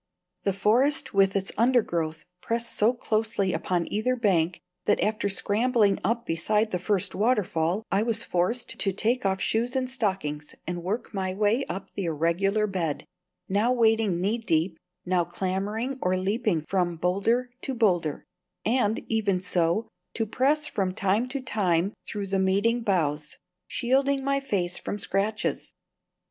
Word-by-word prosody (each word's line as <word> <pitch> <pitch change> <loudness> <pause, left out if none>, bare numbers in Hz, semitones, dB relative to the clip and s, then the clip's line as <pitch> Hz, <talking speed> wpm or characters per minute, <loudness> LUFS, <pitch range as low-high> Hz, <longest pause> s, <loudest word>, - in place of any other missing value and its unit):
The 195 - 0
forest 240 +10 +2
with 195 0 +4
its 195 -1 0
undergrowth 175 -10 +1 0.2
pressed 230 0 -2
so 215 +3 +4
closely 220 -5 -1
upon 175 -2 0
either 220 +5 +1
bank 180 -8 +1 0.3
that - - +3
after 215 -1 0
scrambling 205 +1 +2
up 235 +4 0
beside 210 +7 +1
the 180 - -1
first 195 0 0
waterfall 205 -4 +1
I 195 - +3
was 225 0 +1
forced 185 +8 -1
to 195 - +2
take 225 +2 +1
off 190 0 0
shoes 235 +6 0
and 260 -1 +1
stockings 190 - -2
and 175 0 -4
work 205 +7 -3
my 190 -2 -2
way 215 +6 +2
up 190 +2 -6
the 195 - -4
irregular 170 +6 +1
bed, 170 -8 -2 0.4
now 205 +5 +2
wading 225 -6 +3
knee 205 +6 0
deep, 165 -4 0 0.3
now 180 -1 +2
clambering 200 - -3
or 185 +1 +1
leaping 195 -4 0
from 180 -3 0
boulder 210 +9 +1
to 265 - -3
boulder; 175 -10 +1 0.4
and, 225 -2 +1
even 205 -4 +1
so, 180 +3 0 0.3
to 225 - 0
press 280 +7 +1
from 195 -10 -1
time 205 +4 +1
to 270 +1 -4
time 195 -6 +1
through 205 -1 -3
the 195 0 0
meeting 200 +5 +2
boughs, 155 -8 -1 0.3
shielding 270 +2 +1
my 275 0 +1
face 185 -10 -1
from - - -4
scratches. 210 +2 -1
205 Hz, 150 wpm, -26 LUFS, 185-230 Hz, 0.4 s, with